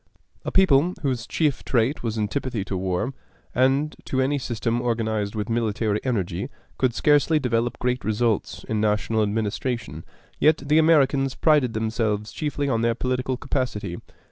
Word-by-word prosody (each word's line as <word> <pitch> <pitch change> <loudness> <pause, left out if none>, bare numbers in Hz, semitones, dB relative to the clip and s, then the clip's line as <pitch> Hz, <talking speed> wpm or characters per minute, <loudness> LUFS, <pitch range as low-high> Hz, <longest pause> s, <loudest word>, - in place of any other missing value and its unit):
A - - -3
people 180 -2 +4
whose 125 -5 -1
chief 150 -5 0
trait 125 +4 +1
was 115 -2 -3
antipathy 110 0 -2
to 95 - -4
war, 95 +7 -1 0.4
and 135 +4 +2
to 130 - -1
any 140 +2 +1
system 120 -1 -2
organized 110 -3 -1
with 105 -1 -2
military 110 -2 0
energy, 115 -9 -2 0.3
could 125 -3 +1
scarcely 150 +2 +3
develop 120 -4 0
great 125 0 -1
results 110 0 -1
in 110 -1 -1
national 110 +1 +1
administration; 105 - -2 0.4
yet 155 0 +5
the 150 +2 +4
Americans 140 -4 +3
prided 145 -7 +3
themselves 110 -1 -1
chiefly 145 -2 -2
on 115 -4 +1
their 115 0 +1
political 130 +1 -1
capacity. 120 -9 -3
120 Hz, 145 wpm, -24 LUFS, 110-135 Hz, 0.4 s, yet